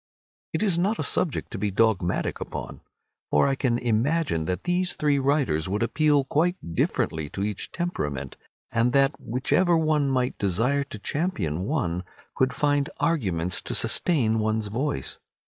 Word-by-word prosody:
It - - -1
is 185 -5 +2
not 205 +5 +1
a - - -1
subject 160 - 0
to 110 - -5
be 105 +1 0
dogmatic 100 -3 +1
upon, - - -6 0.5
for 75 - +4
I 135 - +2
can 130 -3 +1
imagine 120 - 0
that 90 +2 -2
these 180 +1 0
three 145 -2 +2
writers 135 - +1
would 105 +4 0
appeal 145 +4 +3
quite 170 +7 +1 0.2
differently 80 -2 0
to 95 - -5
every 105 +1 0
temperament, 75 - -4 0.4
and 115 +1 +2
that 135 +1 +4
whichever 165 +9 +2
one 155 -3 +2
might 130 -1 0
desire 115 +9 +1
to 125 - -8
champion 100 - -2
one 95 - -1 0.3
could 130 -1 +1
find 145 -1 +1
arguments 90 - 0
to - - -4
sustain 115 -10 +3
one's 110 -1 0
choice. 120 - -3
125 Hz, 155 wpm, -25 LUFS, 100-150 Hz, 0.5 s, for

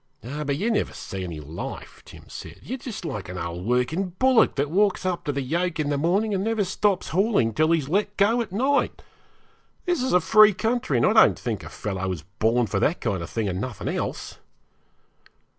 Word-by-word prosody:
'Oh, 145 +6 -5
but 140 -1 -1
you 215 +8 0
never 220 - 0
see 95 -2 -6
any 85 -4 -6
life,' 75 +3 -8
Jim - - -13
said; - - -10
'you're 260 +3 -5
just 230 -7 -7
like 105 - -5
an 90 - -6
old 85 +1 -5
working 125 +10 0
bullock 255 -3 +4
that 140 +1 -1
walks 200 +1 +2
up 180 -2 -1
to 145 - 0
the 140 -1 -2
yoke 170 +4 -1
in 145 -1 0
the - - +1
morning 195 +7 +1
and 190 -1 0
never 220 -1 +1
stops 190 0 0
hauling 185 - +2
till 155 +7 +2
he's 160 -5 +1
let 205 +5 0
go 225 +4 +3
at 230 - -5
night. 265 +8 0 0.8
This 350 -6 0
is 260 - 0
a 180 - +6
free 215 +3 +6
country, 225 - 0
and 120 - +3
I - - +4
don't - - +6
think - - -4
a - - -8
fellow 95 -2 -4
was 90 -5 -4 0.2
born 115 +2 +3
for 100 -2 -1
that 160 - +1
kind 100 -6 -2
of 85 - -6
thing 110 -3 -2
and 95 0 -2
nothing 125 -4 -4
else.' - - -4
160 Hz, 215 wpm, -24 LUFS, -, 0.8 s, a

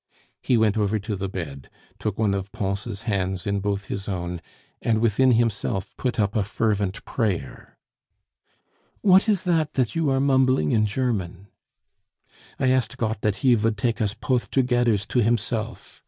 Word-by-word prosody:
He 125 - +2
went 110 -1 +2
over 105 +1 +1
to 105 +1 -4
the 95 0 -3
bed, 70 -8 -6 0.3
took 105 -3 -3
one 105 -3 +2
of 100 0 -3
Pons' 100 +1 -3
hands 95 -5 -2
in 100 -1 0
both 100 0 -2
his 100 0 -5
own, 90 -2 -3 0.4
and 110 -2 +1
within 120 +3 +3
himself 110 -4 0
put 125 -2 -2
up 100 -1 +1
a 105 - +2
fervent 105 -2 -1
prayer. 100 - -3 1.2
"What 190 +2 +5
is 200 -4 +2
that 160 -4 0
that 130 0 0
you 165 -3 +1
are 135 0 +2
mumbling 130 - +3
in 110 -1 +3
German?" 100 -5 -2 1.1
"I 130 - +2
asked 130 0 0
Gott 110 -3 -2
dat 105 -2 +1
He 125 - +6
vould 110 -1 +1
take 115 +2 -1
us 105 -1 0
poth 125 -2 -1
togedders 120 -5 +2
to 125 - 0
Himself!" 115 0 -2
110 Hz, 165 wpm, -24 LUFS, 100-125 Hz, 1.2 s, He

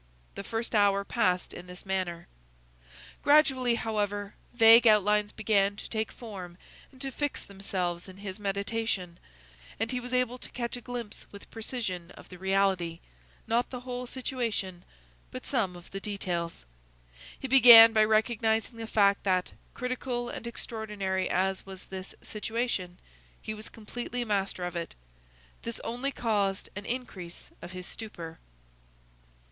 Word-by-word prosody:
The 200 - -6
first 225 +4 -3
hour 200 -2 +4
passed 185 -7 +1
in 180 - -9
this 180 +1 -9
manner. 185 -3 -2 1.0
Gradually, 265 -5 +5
however, 205 -2 -2 0.2
vague 230 0 +8
outlines 210 0 +4
began 205 -2 +2
to - - -7
take 220 -1 -2
form 190 -7 -8 0.3
and 260 - -18
to 270 -1 -2
fix 290 +1 -2
themselves 185 -3 -3
in 185 - -12
his 195 0 -6
meditation, 200 -2 -2 0.6
and 225 +1 0
he 250 - 0
was 245 0 -7
able 250 0 +1
to - - -9
catch 235 -1 -3
a 245 - -7
glimpse 240 -3 -6
with 200 - -12
precision 215 -7 -4
of - - -13
the 180 - -11
reality,—not 195 +4 -1
the 250 -2 -6
whole 250 0 -5
situation, 230 -9 -3 0.5
but 255 0 -8
some 210 -9 0
of 175 0 -13
the 195 - -4
details. 175 - -3 0.7
He 270 - -4
began 235 -4 +11
by 215 -1 +6
recognizing 220 +1 +1
the 225 -1 -5
fact 200 -2 +3
that, 185 -2 +1 0.2
critical 250 -1 -2
and 235 - -6
extraordinary 210 -5 -2
as 190 +1 +1
was 190 -1 -10
this 190 0 -8
situation, 210 -5 -2 0.4
he 215 - -5
was 215 0 -8
completely 240 +2 -5
master 195 -3 -1
of 175 0 -3
it. 170 -1 -4 0.7
This 230 - -5
only 245 +4 -2
caused 205 -6 0
an 205 0 -6
increase 205 -9 -5
of 180 - -8
his 180 -1 -6
stupor. 170 -8 -7
210 Hz, 145 wpm, -29 LUFS, 190-235 Hz, 1.0 s, began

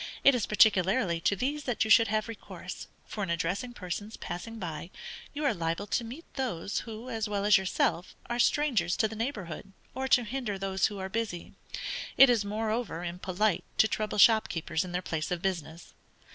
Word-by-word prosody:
It 275 - +8
is 245 -4 0
particularly 195 -3 +4
to 200 - +2
these 285 +7 -2
that 245 -3 +1
you 220 - -1
should 230 +1 +7
have 215 +1 0
recourse, 230 -2 -8 0.2
for 210 - -6
in 195 - -2
addressing 180 +9 -1
persons 205 +2 -5
passing 205 +7 -6
by, 170 -4 -5 0.4
you 300 +1 -3
are 280 - +3
liable 165 +3 -2
to 235 - -1
meet 255 +9 -8
those, 220 - -2
who, 230 +2 -7
as 220 -2 -2
well 200 -1 -1
as 210 - +7
yourself, 185 -1 0
are 240 0 -3
strangers 235 -10 +2
to 220 - +3
the 220 - -8
neighborhood, 205 - -5 0.2
or 265 +1 -2
to 250 -2 +5
hinder 235 -3 -3
those 190 0 +1
who 205 - -7
are 190 0 -4
busy; 200 -4 -4 0.6
it 270 -2 +9
is 230 -3 +2
moreover, 215 -3 -2
impolite, 180 +3 0
to 220 - +6
trouble 215 -1 -2
shopkeepers 200 -7 +4
in 180 - -7
their 180 +1 -2
places 155 -1 -2
of 175 - -5
business. 170 -3 -4
210 Hz, 185 wpm, -29 LUFS, 180-230 Hz, 0.6 s, it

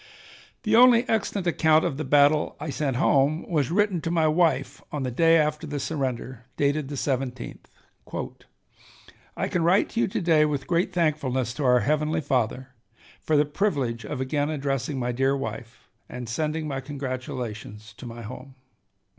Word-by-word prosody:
The 215 0 +2
only 245 0 +6
extant 205 -3 -1
account 160 -2 +3
of 155 -6 -2
the 155 - -2
battle 145 +2 +3
I 155 - -4
sent 140 -3 -1
home 145 +2 +2
was 150 -7 0
written 195 -2 +1
to 165 - -3
my 165 -2 +2
wife 155 -4 +1
on 145 -2 -3
the 130 - -2
day 165 +6 +4
after 150 0 0
the 145 -1 -3
surrender, 130 -4 -4
dated 145 0 +1
the 145 - -5
17th: 130 -2 -3 1.8
"I - - -1
can 175 - -1
write 175 +5 +3
to 230 - -3
you - - +3
to 190 - -2
day 165 -4 +4
with 145 -3 -1
great 175 +3 0
thankfulness 145 -8 0
to 145 - -3
our 125 -1 +5
Heavenly 155 +4 0
Father 130 -1 -1 0.5
for 155 - +1
the 145 - +4
privilege 140 - -1
of 145 - -5
again 145 +3 -1
addressing 140 -1 -2
my 125 -1 -1
dear 135 +3 +1
wife, 115 -2 -7 0.2
and 125 -1 -7
sending 155 +6 -2
my 135 -2 -3
congratulations 125 -6 -6
to 125 - -9
my 115 0 -8
home. 130 +4 -9
145 Hz, 170 wpm, -25 LUFS, 130-160 Hz, 1.8 s, only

